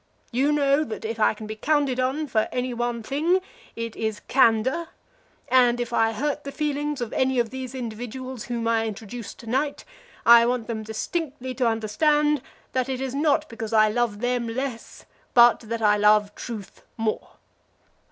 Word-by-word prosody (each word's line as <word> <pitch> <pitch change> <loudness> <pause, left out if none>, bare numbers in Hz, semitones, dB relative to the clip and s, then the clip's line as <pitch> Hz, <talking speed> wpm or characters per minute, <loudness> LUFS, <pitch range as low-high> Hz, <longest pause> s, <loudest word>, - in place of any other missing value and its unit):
You 265 +4 +2
know 285 0 +3
that 225 -5 -6
if 225 +1 -4
I 215 - +3
can 215 - -8
be 215 +1 -5
counted 280 +1 +1
upon 265 +5 0
for 220 -6 +1
any 250 0 -2
one 240 -1 -2
thing 315 +10 +1 0.4
it 230 -1 -5
is 220 -1 -2
candor, 260 +5 +2 0.6
and 245 -2 +4
if 240 0 -3
I 225 -1 +3
hurt 290 +6 -2
the 280 - -6
feelings 295 -1 -2
of 235 - -4
any 260 0 +1
of 235 -2 +1
these 260 0 -6
individuals 245 +1 -6
whom 235 -2 -3
I 225 -1 +2
introduce 220 +2 -7
to - - -14
night, 275 +5 -1 0.4
I 235 0 +9
want 245 -2 -1
them 225 -2 -4
distinctly 260 +4 -4
to 250 -1 +1
understand 295 +7 +2 0.3
that 255 0 0
it 260 -1 -2
is 265 -1 -3
not 300 +2 +2
because 225 -3 -6
I 215 -1 +5
love 220 -2 -1
them 245 -1 0
less, 245 0 -5 0.3
but 240 0 +7
that 230 0 -5
I 210 0 +5
love 210 0 +4
truth 215 -4 -8 0.2
more. 225 -1 -2
240 Hz, 175 wpm, -25 LUFS, 225-270 Hz, 0.6 s, I